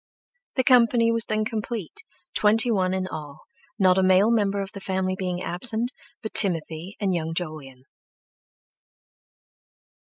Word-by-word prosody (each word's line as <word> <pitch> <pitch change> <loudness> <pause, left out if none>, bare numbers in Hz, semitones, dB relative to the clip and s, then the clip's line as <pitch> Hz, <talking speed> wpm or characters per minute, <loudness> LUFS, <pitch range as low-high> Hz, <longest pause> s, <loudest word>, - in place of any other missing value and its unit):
The 260 - +1
company 235 -2 +3
was 230 0 -1
then 215 0 -2
complete, 225 - -5 0.3
twenty 220 +3 +2
one 185 -4 0
in 185 0 -3
all, 150 -3 -9 0.4
not 190 -2 +3
a - - +3
male 190 +4 +3
member 200 -3 0
of 195 0 -5
the 200 - -9
family 190 -1 -3
being 180 -1 -4
absent 225 +7 +3 0.3
but 220 - -6
Timothy 170 -1 +3
and 195 -3 -1
young 165 -1 -3
Jolyon. 150 -7 -6
190 Hz, 135 wpm, -23 LUFS, 180-225 Hz, 0.4 s, company